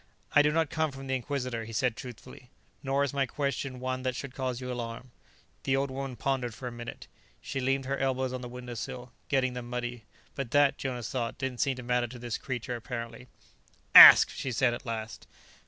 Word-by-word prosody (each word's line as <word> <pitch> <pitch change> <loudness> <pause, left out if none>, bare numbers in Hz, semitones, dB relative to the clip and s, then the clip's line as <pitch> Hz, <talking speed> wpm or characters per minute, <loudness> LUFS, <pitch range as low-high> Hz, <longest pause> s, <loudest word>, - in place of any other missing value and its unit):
"I 145 - +7
do 150 0 +3
not 160 -1 0
come 160 0 0
from 135 -1 -9
the 130 - -2
Inquisitor," 125 -3 -3
he 115 +1 -9
said 125 0 +1
truthfully, 125 +1 -11 0.3
"nor 135 +1 +1
is 140 - -2
my 135 -2 +1
question 140 -2 -3
one 130 0 -3
that 130 -1 -2
should 135 -3 -6
cause 130 -2 -3
you 125 -1 -5
alarm." 120 +1 -6 0.5
The 135 - +1
old 135 0 -1
woman 135 -1 -5
pondered 125 -1 -2
for 125 - -7
a - - -4
minute. 120 0 -8 0.3
She 135 - -5
leaned 135 +1 0
her 135 +1 -2
elbows 130 -1 0
on 130 - -4
the 125 - -7
window 125 0 -8
sill, 125 +1 -6 0.2
getting 130 -2 +1
them 125 -1 -7
muddy. 120 -2 -4 0.3
But 135 -4 -4
that, 145 +1 +3
Jonas 125 -3 -4
thought, 120 -3 -3
didn't 130 -3 -3
seem 135 -3 +1
to 125 - -8
matter 125 0 +1
to 125 +2 -10
this 120 -1 -4
creature, 125 -1 -4
apparently. 115 +1 -7 0.7
"Ask," - - +12
she 130 - -4
said 120 0 +2
at 120 - -7
last. 110 -1 -5
125 Hz, 210 wpm, -29 LUFS, 120-135 Hz, 0.7 s, Ask